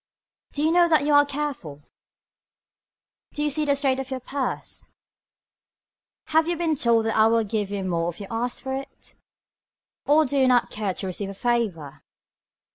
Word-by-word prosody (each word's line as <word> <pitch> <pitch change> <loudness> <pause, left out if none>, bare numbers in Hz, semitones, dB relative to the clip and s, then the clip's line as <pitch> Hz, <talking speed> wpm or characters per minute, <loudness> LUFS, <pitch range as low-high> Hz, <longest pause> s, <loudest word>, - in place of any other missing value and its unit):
Do 290 - -1
you 315 - +3
know 345 0 +4
that 310 -3 +3
you 295 - +2
are 290 0 +6
careful. 265 - -5 1.5
Do 295 - -2
you 295 - +1
see 305 +2 0
the 285 -1 +2
state 270 -2 +1
of 265 0 -5
your 260 -1 -4
purse. 260 0 -5 1.4
Have 320 +1 +3
you 345 -1 0
been 325 -2 0
told 235 -4 +2
that 225 - -1
I 220 0 +5
will 230 0 +2
give 210 -1 -2
you 200 -1 -3
more 170 -2 -1
if 175 - -9
you 200 - -6
ask 240 +2 -3
for 265 - -3
it. 270 +1 -10 0.9
Or 305 +2 +5
do 280 +1 -2
you 265 -1 +4
not 245 -2 +3
care 205 -4 -3
to - - -2
receive 190 +2 -3
a 195 - -8
favor. 190 - -2
250 Hz, 185 wpm, -24 LUFS, 205-290 Hz, 1.5 s, are